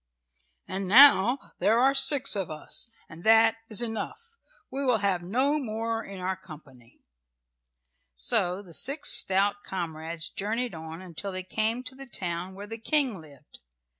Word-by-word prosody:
And 190 0 -4
now 250 +2 +6
there 225 +3 +2
are 270 +2 +4
six 275 -2 +5
of 195 -4 -2
us, 155 +9 -5 0.2
and 165 +2 -13
that 225 0 +5
is 220 +2 -1
enough. 235 - -6 0.4
We 275 +1 -4
will 250 -4 +2
have 195 -3 -1
no 260 +11 0
more 225 -2 -4
in 195 -1 -9
our 185 +1 -2
company." 145 -10 -15 1.1
So 180 - +1
the 175 -4 -13
six 275 - +2
stout 200 +2 +2
comrades 165 -3 -5
journeyed 225 +3 -3
on 160 +2 -9
until 185 +2 -6
they 185 0 -5
came 220 +6 -2
to 255 +1 -7
the 270 +1 -10
town 180 -3 -3
where 200 +1 -9
the 225 +2 -9
King 260 - 0
lived. 145 -1 -17
200 Hz, 155 wpm, -27 LUFS, 175-240 Hz, 1.1 s, now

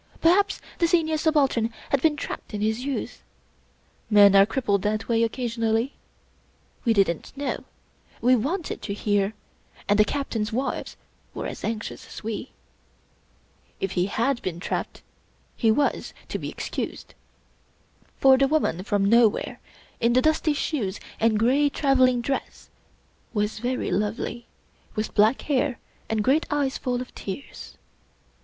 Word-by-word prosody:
Perhaps 385 +5 +3 0.2
the 340 - +4
Senior 325 -2 +2
Subaltern 285 -8 +2 0.2
had 280 - +2
been 310 0 +3
trapped 285 - -6
in 205 - -3
his 220 +3 0
youth. 280 -1 -4 0.9
Men 205 -2 +7
are 195 +1 +7
crippled 220 -5 0
that 215 +2 -1
way 230 -1 +2
occasionally. 230 +1 0 0.9
We 235 - +2
didn't 195 - +1
know; 285 - -3 0.5
we 250 +1 +4
wanted 305 - -2
to 200 - -4
hear; 205 0 0 0.5
and 205 +1 +3
the - - +8
Captains' 225 -3 -2
wives 255 +5 -3 0.4
were - - -4
as - - -6
anxious 225 -1 -4
as - - -10
we. 225 +3 -4 1.3
If 195 - -2
he 180 0 +1
had 235 +5 0
been 175 -2 -4
trapped, - - -4 0.5
he 225 - +2
was 280 +6 +1
to - - -3
be - - -4
excused; - - -5 1.0
for 265 -1 +6
the 275 - +4
woman 280 - +1
from 200 0 +1
nowhere, 225 +1 +3 0.4
in 235 0 +3
the 255 - +5
dusty 310 0 +2
shoes 255 -10 -2 0.2
and 225 -1 +3
gray 265 +7 +3
traveling 260 -4 +3
dress, 270 +3 -4 0.6
was 210 +1 0
very 250 +2 -2
lovely, 220 +3 -2 0.5
with 215 +1 -2
black 215 +4 +3
hair 280 -3 0 0.3
and 220 -1 0
great 280 +7 +2
eyes 285 -2 0
full 250 -1 -1
of 250 - -9
tears. 200 +8 -8
235 Hz, 140 wpm, -25 LUFS, 210-275 Hz, 1.3 s, the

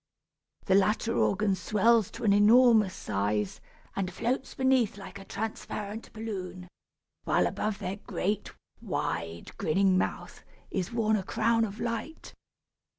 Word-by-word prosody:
The 190 - +2
latter 210 +4 +2
organ 200 0 +2
swells 215 +4 +3
to - - -9
an 205 -3 +4
enormous 215 -1 +5
size, 105 0 -2 0.3
and 190 -2 -2
floats 245 +8 -2
beneath 260 -6 +2
like 200 0 -9
a 195 - -11
transparent 215 0 -5
balloon, 185 -5 -6 0.6
while - - +3
above 215 -1 -2
their 195 -1 -4
great, 205 0 -3 0.3
wide 85 0 -4
grinning 185 +3 +3
mouth - - -4 0.3
is 185 +1 -2
worn 220 -2 +2
a 195 - -3
crown 225 +3 +2
of 210 +1 -8
light. 240 +7 -4
205 Hz, 130 wpm, -29 LUFS, 185-225 Hz, 0.6 s, enormous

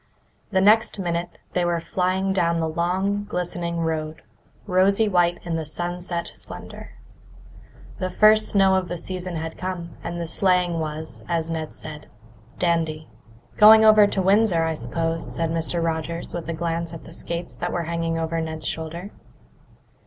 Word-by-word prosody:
The 190 -2 +2
next 215 +3 +4
minute 175 -2 -3 0.2
they 180 - +1
were 175 -1 +1
flying 185 +3 0
down 170 -3 +1
the 160 - 0
long, 185 +5 0
glistening 175 -3 -3
road, 155 -1 -3 0.4
rosy 195 +3 +3
white 175 -3 +2
in 170 - -4
the 160 - -2
sunset 175 +2 -3
splendour. - - -9 1.1
The 185 0 -1
first 215 +3 +5
snow 195 -2 +4
of 190 -1 +1
the 175 - -4
season 180 +1 -5
had 160 0 -5
come, 180 -2 -5
and 170 0 -4
the 170 - -2
sleighing 180 -1 +1
was, 155 0 -5
as 165 -1 -1
Ned 160 -1 -4
said, 150 -1 -9 0.5
"dandy." 160 -3 0 0.5
"Going 220 +1 +9
over 215 -1 +7
to 195 -1 0
Windsor, 195 -3 +4
I 160 0 0
suppose," 165 +5 -3
said 165 -1 -1
Mr. 165 +1 0
Rogers, 165 +1 -2
with 170 -1 -5
a - - -1
glance 165 0 -3
at 165 - -10
the 165 - -12
skates 170 -5 -5
that - - -3
were 175 - -1
hanging 165 0 -2
over 165 0 -1
Ned's 160 -1 -5
shoulder. 170 +5 -5
170 Hz, 160 wpm, -23 LUFS, 165-185 Hz, 1.1 s, Going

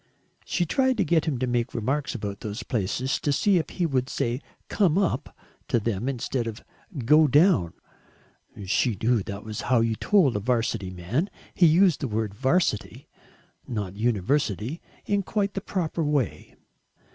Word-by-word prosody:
She 175 - 0
tried 260 - +1
to 205 - +3
get 165 0 +2
him 150 -6 -1
to 130 - -1
make 120 -1 -1
remarks 135 +6 -1
about 100 -2 -5
those 110 +3 -5
places 120 +5 -1
to 145 - 0
see 190 +7 +3
if 160 - -4
he 180 - -1
would 130 -4 0
say 120 +3 -2 0.3
"come 185 -5 +2
up" 195 -3 -1 0.3
to 120 - +2
them 115 +2 -2
instead 125 -2 -2
of 110 -1 -7 0.4
"go 150 +4 +6
down" 145 - +4 0.9
she 110 +2 +1
knew 115 -1 +2
that 100 +1 -6
was 110 -1 -5
how 125 -2 +2
you 115 -1 +1
told 165 - +3
a - - +1
'Varsity 115 -4 -1
man. 95 - -2 0.2
He 175 - +5
used 175 +1 +4
the 140 - -2
word 110 -2 -2
"'Varsity" 130 - 0 0.6
not 100 -5 -4
university 115 - 0 0.2
in 200 -1 +1
quite 200 0 -1
the 195 - -3
proper 175 -4 -2
way. 145 -6 -1
130 Hz, 165 wpm, -26 LUFS, 110-165 Hz, 0.9 s, go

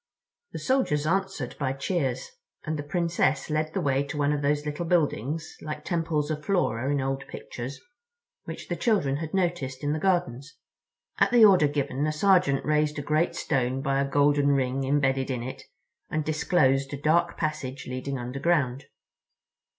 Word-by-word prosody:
The - - -6
soldiers 255 - +1
answered 190 -6 -1
by 135 -2 0
cheers, 135 -3 -2 0.3
and 155 - -2
the - - -1
Princess 165 -1 0
led 155 0 0
the 190 - 0
way 140 -3 +1
to 145 +2 -6
one 145 0 +2
of 145 - -1
those 145 +1 0
little 150 +3 -3
buildings, 160 -2 0
like 150 0 -6
Temples 160 -3 -1
of 150 -1 -4
Flora 140 - 0
in 145 - +1
old 135 +1 -2
pictures, 125 +3 -7 0.7
which - - -7
the - - -2
children 175 - +1
had 160 0 -5
noticed 170 -8 -1
in 145 +1 +1
the 155 - -2
gardens. 150 -6 -1 0.6
At - - +5
the 240 -3 +7
order 185 -7 +6
given 145 0 -1
a - - +1
sergeant 155 -4 +3
raised 150 0 +1
a 145 - -3
great 155 +3 +1
stone 130 -2 -1
by 135 -1 +1
a 140 - -1
golden 145 0 +3
ring 135 -1 +1
embedded 135 -1 +1
in 125 -3 -2
it 130 - -6 0.5
and 155 -1 -1
disclosed 140 -3 +2
a - - -7
dark 165 +4 +2
passage 140 -4 -3
leading 130 +2 -4
underground. 135 +1 0
145 Hz, 170 wpm, -26 LUFS, 135-160 Hz, 0.7 s, the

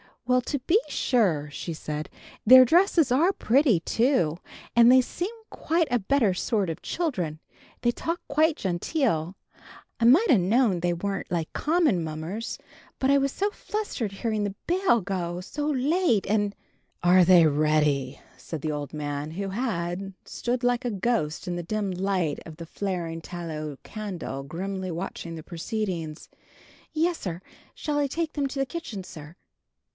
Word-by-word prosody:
"Well, 250 0 +3
to 285 +3 -2
be 345 - +3
sure," 170 - +1
said 155 0 -5
she, - - -24 0.3
"their 255 +3 +10
dresses 330 - +4
are 330 +10 +4
pretty, 245 - +3
too. 225 - +1 0.4
And 235 0 +7
they 255 +1 +7
seem 350 +9 -4 0.2
quite 330 -1 0
a 245 - +3
better 225 -1 +2
sort 195 0 0
of 160 - -7
children, 180 - -2 0.4
they 240 - +3
talk 335 +7 -3
quite 310 +2 +3
genteel. 185 - -1 0.6
I 230 - +2
might 320 - +6
ha' 235 - +6
knowed 200 0 +2
they 175 0 +1
weren't 195 +3 -3
like 165 -2 -2
common 305 - +2
mummers, 160 +8 -4 0.4
but 265 +1 +2
I 280 - +6
was 275 0 +1
so 405 +6 -1
flusterated 275 - -4
hearing 215 -3 0
the 200 -1 -4
bell 360 - +3
go 180 -2 -3
so 295 +10 -4
late, 290 - +2
and 205 0 +1 0.2
" - - -41
"Are 180 +1 +6
they 175 -2 +7
ready?" 150 -3 +1 0.2
said 160 -4 -7
the 155 - -1
old 145 0 -5
man, 145 0 -4
who 195 +4 -4
had 190 -4 -3
stood 245 +1 -3
like 245 0 +1
a 245 - 0
ghost 195 -7 -1
in 175 -1 -2
the - - -2
dim 205 +2 -2
light 185 -4 -1
of 160 - -9
the 165 +1 -8
flaring 170 -2 -3
tallow 155 -5 -6
candle, 185 -10 -5
grimly 185 +5 -4
watching 170 -1 -5
the 160 - -8
proceedings. 170 -3 -4 0.6
"Yes, 330 +2 +1
sir. 175 -2 -5 0.3
Shall 295 -1 -1
I 285 - +2
take 320 +3 -3
them 285 -2 0
to 275 +1 -5
the 270 - +2
kitchen, 260 - -6
sir?" 155 -2 -11
200 Hz, 165 wpm, -26 LUFS, 170-260 Hz, 0.6 s, their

